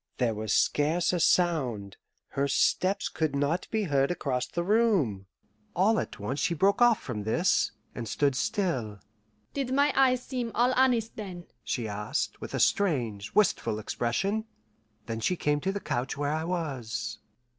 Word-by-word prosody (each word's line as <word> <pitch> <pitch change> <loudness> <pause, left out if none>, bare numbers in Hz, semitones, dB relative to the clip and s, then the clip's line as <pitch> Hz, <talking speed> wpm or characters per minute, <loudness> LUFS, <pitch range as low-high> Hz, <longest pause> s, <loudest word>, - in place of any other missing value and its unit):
There 120 -3 +1
was 110 0 -4
scarce 165 +5 +2
a 175 - +1
sound 130 - +1 0.3
her 140 +1 0
steps 185 +7 +1
could 155 -3 -2
not 145 +6 0
be 220 -1 0
heard 140 -6 +2
across 130 -7 -1
the 170 - -3
room. 180 - +2 0.5
All 215 +5 +3
at - - -5
once 125 +8 -3
she 170 - 0
broke 195 +8 +2
off 240 -2 +6
from 115 -5 -5
this, 170 - +2 0.2
and 120 -2 -5
stood 140 +5 +1
still. 160 - -1 0.5
"Did 270 -3 -2
my 285 +2 +3
eyes 255 -2 +3
seem 245 -3 -3
all 245 +2 +3
honest 250 -4 +2
then?" 185 -5 -7 0.2
she 115 -3 -2
asked, 105 0 -3
with - - -5
a - - -1
strange, 120 - +1
wistful 115 - +2
expression. 195 - -1 0.6
Then 115 -1 -4
she 180 +11 +1
came 150 -3 0
to 190 - 0
the 200 - -3
couch 140 -5 -3
where 145 +1 -1
I 160 +1 -2
was. 135 - -3
160 Hz, 165 wpm, -28 LUFS, 120-200 Hz, 0.6 s, off